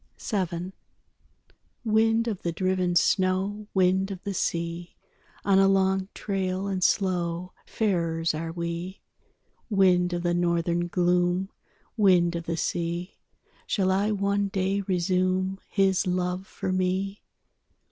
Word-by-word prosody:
VII 185 -4 -3 1.1
Wind 225 +1 +3
of 210 -5 -3
the 170 - -1
driven 185 0 0
snow, 190 +4 +1
Wind 190 +1 +3
of 190 -2 -7
the 200 - -3
sea, 170 -1 -3 0.5
On 195 -1 +4
a 195 - +5
long 190 0 +2
trail 190 -1 -2
and 190 -2 -2
slow 180 -2 0
Farers 170 -6 0
are 165 +1 -4
we. 170 +2 -4 0.7
Wind 180 -3 +3
of 175 0 -2
the 175 -1 +1
Northern 175 0 +1
gloom, 180 +1 +1 0.5
Wind 180 -4 +4
of 170 -1 -4
the 165 0 -2
sea, 170 +2 -3 0.5
Shall 190 -2 +1
I 200 +3 +1
one 200 -1 0
day 195 +1 0
resume 185 +1 0
His 195 -1 +2
love 180 +1 -1
for 185 - -4
me? 185 +2 -1
185 Hz, 125 wpm, -26 LUFS, 175-195 Hz, 1.1 s, a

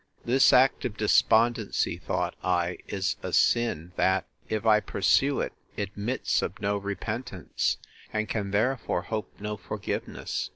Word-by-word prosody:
This 130 +3 +5
act 130 +1 +4
of 110 -4 -3
despondency, 110 +1 +3
thought - - -2
I, 90 -1 0
is 95 -1 -1
a - - -4
sin, 115 -8 +2
that, 95 0 +2 0.2
if 110 +1 -2
I 110 -1 +6
pursue 135 +7 +2
it, - - -3 0.2
admits 105 +5 -1
of - - -4
no 100 +1 0
repentance, 100 -2 -3 0.3
and 110 0 -1
can 100 -3 -2
therefore 110 -2 0
hope 110 -2 -4
no 105 +1 -4
forgiveness. - - -4
105 Hz, 135 wpm, -27 LUFS, 100-115 Hz, 0.3 s, I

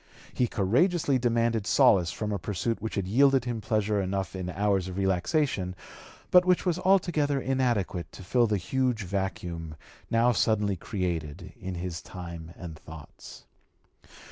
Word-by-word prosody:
He 125 - +1
courageously 135 - +2
demanded 115 -3 +1
solace 90 -4 +4
from 105 -1 -4
a 100 - -2
pursuit 105 +6 -2
which 110 - -4
had 100 -2 -2
yielded 135 +4 +4
him 120 -2 -3
pleasure 105 -2 0
enough 95 -1 -3
in 90 -1 -4
hours 100 -1 0
of 95 0 -6
relaxation, 95 - 0 0.6
but 180 0 +7
which 180 0 +2
was 180 -1 +1
altogether 170 -7 +2
inadequate 120 -9 -1
to - - -10
fill 120 +6 +2
the 105 -1 +1
huge 125 +3 -1
vacuum 85 -4 -4 0.3
now 115 +2 +3
suddenly 105 -4 +1
created 85 -5 -4
in 95 0 -6
his 85 -1 -5
time 85 -3 -8
and 80 -3 -8
thoughts. 80 -1 -12
100 Hz, 145 wpm, -28 LUFS, 90-125 Hz, 0.6 s, but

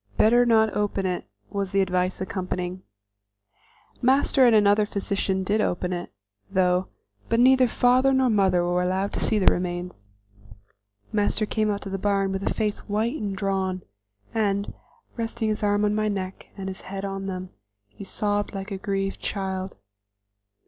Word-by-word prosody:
"Better 240 +3 +5
not 220 -2 +3
open 205 -2 -1
it," 180 -1 -2 0.3
was 200 -1 -2
the 195 +1 +2
advice 185 -1 0
accompanying. 185 -1 -4 1.2
Master 265 0 +4
and 230 - +5
another 205 0 +4
physician 195 -1 -1
did 210 +3 +1
open 180 -2 -1
it, 175 0 -5 0.4
though, 185 -1 +2 0.4
but 230 - +2
neither 255 +1 +6
father 250 +3 +3
nor 265 -1 +3
mother 190 -5 +3
were 175 +1 +1
allowed 190 +2 -1
to - - -2
see 220 - +2
the 195 - +1
remains. 175 - -5 1.0
Master 210 +1 +1
came 215 0 0
out 200 -1 -1
to 195 - -6
the 195 - -3
barn 195 -1 +1
with 195 0 -2
a - - -1
face 210 -2 -1
white 215 +3 0
and 205 -10 -3
drawn, 190 -2 -1 0.5
and, 200 -2 0 0.4
resting 225 -1 -2
his 215 - -1
arm 205 0 +2
on 210 - +1
my 215 0 0
neck 195 -2 -4
and 195 -1 -5
his 190 0 -6
head 195 +1 -6
on 195 0 -4
them, 185 -1 -5 0.4
he 155 - -11
sobbed 205 +1 -1
like 195 +1 -5
a 195 - -2
grieved 195 0 -2
child. 190 -1 -3
195 Hz, 165 wpm, -25 LUFS, 185-215 Hz, 1.2 s, neither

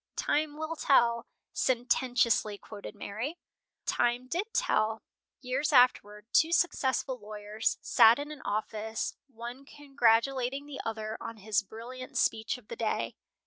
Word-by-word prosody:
"'Time 300 0 0
will 315 +1 -3
tell,'" 235 -5 +3 0.3
sententiously 245 -3 +1
quoted 210 +1 -10
Mary. 225 +11 -5 0.5
Time 240 +1 +1
did 375 - -2
tell. 220 - +1 0.4
Years 265 +4 -1
afterward 215 -5 +4
two 320 +1 +5
successful 265 -6 +1
lawyers 210 +1 -3
sat 230 -2 +6
in 290 +1 -5
an 300 -3 -9
office, 215 +1 -3
one 240 +1 -8
congratulating 270 -1 +1
the 280 -2 -6
other 220 -1 -4
on 230 - -6
his 210 0 +1
brilliant 240 +5 -8
speech 220 +3 +1
of 240 -4 -18
the - - -6
day. 225 -1 -1
240 Hz, 130 wpm, -30 LUFS, 220-275 Hz, 0.5 s, sat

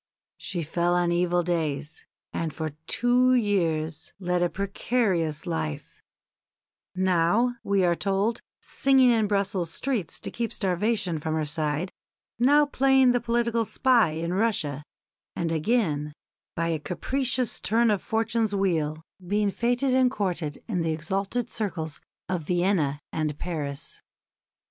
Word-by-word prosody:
She 175 -4 -3
fell 170 +3 0
on 175 -1 +2
evil 175 0 +2
days, 160 -3 -2 0.3
and 165 -1 -2
for 155 0 -4 0.2
two 250 +4 +3
years 165 -8 0
led 180 -1 0
a 175 - +2
precarious 190 -5 -1
life 160 - -4 0.9
now, 185 +7 +2
we 200 -2 +2
are 175 -1 +3
told, 200 +5 0 0.2
singing 265 -2 +4
in 220 -3 +2
Brussels 195 -4 0
streets 230 - -2
to - - -5
keep 230 -2 -3
starvation 190 -2 0
from 155 +1 -2
her 155 -1 0
side, 150 +3 -2 0.5
now 290 +4 +5
playing 265 -2 +4
the 245 -1 +1
political 235 0 +1
spy 230 -6 +3
in 165 +2 -3
Russia, 180 -9 0 0.5
and 165 -1 -1
again, 155 -4 0 0.4
by 165 0 0
a 160 -2 0
capricious 250 - -1
turn 230 +2 +2
of 205 - 0
fortune's 225 -1 0
wheel, 160 -5 0 0.2
being 205 +2 +1
fêted 245 +5 +1
and 255 -1 +4
courted 180 - -3
in 190 -7 -1
the 165 -1 0
exalted 195 +8 -2
circles 165 -8 -4 0.3
of 180 -2 -1
Vienna 175 -3 +1
and 155 -2 -1
Paris. 145 -5 -5
185 Hz, 135 wpm, -26 LUFS, 165-230 Hz, 0.9 s, now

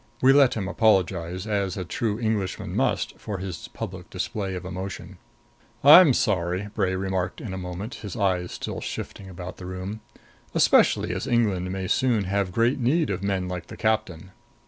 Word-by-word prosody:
We 130 +1 +6
let 140 -3 +5
him 100 -4 -2
apologize, 95 -4 +1
as 100 -3 -1
a 95 - -3
true 105 +4 -2
Englishman 110 -5 -2
must, - - 0
for 105 - -5
his 95 -2 -6
public - - -7
display 95 -3 -3
of 90 0 -6
emotion. 95 -1 -6 0.6
"I'm 150 -1 +9
sorry," 95 0 0
Bray 95 -3 0
remarked 95 -1 -2
in 105 -5 -6
a - - -4
moment, 90 +6 -6
his 105 -5 -6
eyes 95 -4 0
still - - -5
shifting 95 -1 -6
about 90 -1 -8
the 90 - -8
room 95 +4 -6 0.5
"especially - - +4
as - - -4
England 100 -7 +1
may 95 0 -3
soon 120 0 +2
have 100 0 -1
great 115 +7 +2
need 145 +3 +2
of 95 -1 -3
men 95 -2 -1
like 90 -2 -5
the - - -10
captain. 110 -5 -1
95 Hz, 170 wpm, -25 LUFS, 90-110 Hz, 0.6 s, I'm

